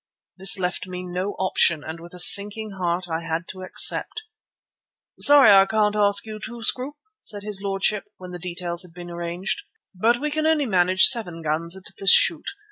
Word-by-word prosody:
This 195 Hz, +2 st, +3 dB
left 180 Hz, 0 st, -3 dB
me 180 Hz, 0 st, -7 dB
no 180 Hz, +3 st, -4 dB
option, 170 Hz, -4 st, +1 dB
and 160 Hz, +1 st, -8 dB
with 170 Hz, +2 st, -13 dB
a -, -, -7 dB
sinking 205 Hz, +4 st, +4 dB
heart 180 Hz, -1 st, -3 dB
I 165 Hz, -1 st, -4 dB
had 165 Hz, +1 st, -5 dB
to 185 Hz, -, -9 dB
accept. 185 Hz, -, 0 dB, 1.0 s
"Sorry 285 Hz, -5 st, +7 dB
I 195 Hz, -1 st, +6 dB
can't 210 Hz, 0 st, 0 dB
ask 200 Hz, 0 st, +2 dB
you 215 Hz, -1 st, -8 dB
too, 235 Hz, 0 st, -8 dB
Scroope," 265 Hz, +6 st, -1 dB, 0.2 s
said 205 Hz, -2 st, -6 dB
his 205 Hz, -2 st, 0 dB
lordship, 200 Hz, +1 st, -1 dB
when 180 Hz, -1 st, -11 dB
details 175 Hz, 0 st, -5 dB
had 180 Hz, -2 st, -9 dB
been 175 Hz, -1 st, -10 dB
arranged, 170 Hz, +2 st, -4 dB, 0.3 s
"but 225 Hz, +6 st, +1 dB
we 300 Hz, +4 st, -4 dB
can 310 Hz, +1 st, -1 dB
only 315 Hz, -3 st, +1 dB
manage 185 Hz, -3 st, +1 dB
seven 175 Hz, -9 st, +1 dB
guns 165 Hz, +4 st, -3 dB
at 190 Hz, -, -14 dB, 0.2 s
this 195 Hz, -, +1 dB
shoot. -, -, +4 dB
190 Hz, 185 wpm, -22 LUFS, 175-210 Hz, 1.0 s, Sorry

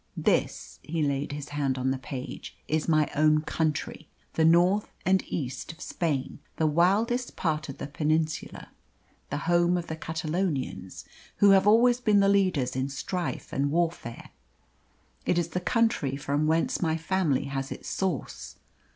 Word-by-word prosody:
This" -, -, 0 dB
he 160 Hz, 0 st, -2 dB
laid 140 Hz, 0 st, -1 dB
his 145 Hz, 0 st, -6 dB
hand 140 Hz, -3 st, -1 dB
on 130 Hz, +1 st, 0 dB
the 135 Hz, -, -2 dB
page 130 Hz, +1 st, -7 dB
"is 155 Hz, 0 st, 0 dB
my 155 Hz, -2 st, +3 dB
own 155 Hz, +1 st, +4 dB
country, 155 Hz, -1 st, -2 dB, 0.2 s
the 160 Hz, -, +2 dB
north 175 Hz, +5 st, +4 dB
and 190 Hz, 0 st, +3 dB
east 135 Hz, -1 st, -4 dB
of 165 Hz, -, -16 dB
Spain, 150 Hz, -7 st, -2 dB, 0.2 s
the 160 Hz, -, 0 dB
wildest 200 Hz, +10 st, +2 dB
part 155 Hz, -3 st, -1 dB
of 135 Hz, -, -7 dB
the -, -, -5 dB
Peninsula, 155 Hz, +1 st, -2 dB, 0.6 s
the -, -, -2 dB
home 175 Hz, +1 st, +3 dB
of 175 Hz, -, -3 dB
the 160 Hz, -, -5 dB
Catalonians, 160 Hz, -, -3 dB, 0.3 s
who 200 Hz, -1 st, +6 dB
have 195 Hz, +1 st, +5 dB
always 240 Hz, +3 st, +5 dB
been 215 Hz, -4 st, +3 dB
the 200 Hz, -, +4 dB
leaders 180 Hz, -11 st, +2 dB
in 130 Hz, +1 st, -1 dB
strife 175 Hz, +6 st, -4 dB
and 140 Hz, +1 st, +1 dB
warfare. 165 Hz, -7 st, -2 dB, 1.0 s
It 175 Hz, -, +2 dB
is 170 Hz, -1 st, 0 dB
the 180 Hz, -, -2 dB
country 225 Hz, -, +1 dB
from 145 Hz, +2 st, -1 dB
whence 160 Hz, +1 st, +1 dB
my 160 Hz, -2 st, +1 dB
family 165 Hz, -4 st, 0 dB
has 135 Hz, 0 st, -4 dB
its -, -, -7 dB
source. 185 Hz, -8 st, -3 dB
160 Hz, 160 wpm, -27 LUFS, 140-180 Hz, 1.0 s, who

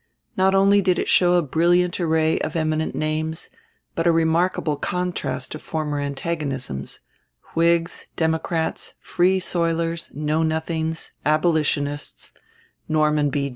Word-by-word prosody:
Not 190 Hz, +1 st, +3 dB
only 200 Hz, +1 st, +5 dB
did 185 Hz, -2 st, +2 dB
it -, -, -1 dB
show 180 Hz, -1 st, +4 dB
a 175 Hz, -, +3 dB
brilliant 175 Hz, +5 st, +2 dB
array 160 Hz, -2 st, +2 dB
of 155 Hz, -, -3 dB
eminent 155 Hz, -1 st, -1 dB
names, 155 Hz, +1 st, -2 dB, 0.4 s
but 165 Hz, +1 st, 0 dB
a -, -, +6 dB
remarkable 165 Hz, -1 st, +1 dB
contrast 180 Hz, +3 st, -3 dB
of 155 Hz, -, -7 dB
former 150 Hz, -2 st, -3 dB
antagonisms: 140 Hz, -, -3 dB, 0.5 s
Whigs, 170 Hz, 0 st, +1 dB
Democrats, 160 Hz, 0 st, -1 dB
Free 185 Hz, +2 st, +2 dB
Soilers, 170 Hz, -2 st, -1 dB
Know 150 Hz, +2 st, 0 dB
Nothings, 160 Hz, 0 st, -2 dB
Abolitionists; 150 Hz, -2 st, 0 dB, 0.6 s
Norman 150 Hz, -1 st, +2 dB
B. 140 Hz, 0 st, -1 dB
160 Hz, 120 wpm, -23 LUFS, 155-170 Hz, 0.6 s, a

